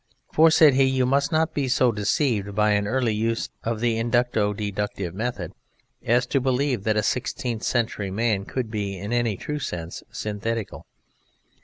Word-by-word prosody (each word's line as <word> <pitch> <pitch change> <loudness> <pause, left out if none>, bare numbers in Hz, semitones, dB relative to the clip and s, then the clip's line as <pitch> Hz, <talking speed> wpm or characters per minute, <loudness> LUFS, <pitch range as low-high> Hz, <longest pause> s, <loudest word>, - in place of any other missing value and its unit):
"For," 160 +1 +6
said 155 -3 +6
he, 135 +1 +4
"you 130 -1 +2
must 140 +4 +1
not 160 0 +1
be 140 -2 -1
so 125 -1 +3
deceived 105 -1 0
by 105 0 +3
an 105 0 +1
early 120 -1 +1
use 115 +2 -1
of 115 -1 -2
the 115 -2 +1
Inducto 120 -3 +1
Deductive 100 -3 -3
method 100 -4 -4 0.5
as 120 +2 +2
to 135 +2 0
believe 130 -3 0
that 110 -1 +2
a 105 - +2
sixteenth 120 -2 -2
century 110 -5 -1
man 105 0 0
could 125 -2 -4
be, 100 -3 -3
in 100 +6 -4
any 120 -4 +1
true 150 0 -4
sense, 85 - -5
synthetical." 110 0 -4
115 Hz, 170 wpm, -24 LUFS, 105-125 Hz, 0.5 s, For